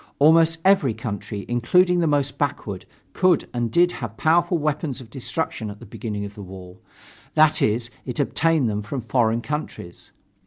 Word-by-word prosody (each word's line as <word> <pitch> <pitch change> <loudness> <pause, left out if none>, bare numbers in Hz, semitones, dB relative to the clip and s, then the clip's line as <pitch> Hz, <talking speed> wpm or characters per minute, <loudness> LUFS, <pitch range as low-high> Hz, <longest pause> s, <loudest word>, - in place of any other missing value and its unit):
Almost 165 +2 +5
every 170 - +4
country, 105 -2 -5
including 180 +10 +3
the 165 - +2
most 145 -2 0
backward, 110 -10 -3 0.3
could 185 -4 +2
and 120 -1 -1
did 175 +9 +3
have 115 - -7
powerful 170 +2 +2
weapons 150 -3 -2
of 120 -4 -13
destruction 125 -3 -3
at 105 0 -9
the - - -11
beginning 105 -1 -5
of 100 - -9
the 105 - -10
war; 90 -1 -11 0.6
that 155 0 +4
is, 115 +3 +1
it 125 +1 -6
obtained 160 -1 +2
them 105 -1 -2
from 125 +6 -5
foreign 115 -1 +1
countries. 150 - -6
125 Hz, 165 wpm, -23 LUFS, 105-160 Hz, 0.6 s, Almost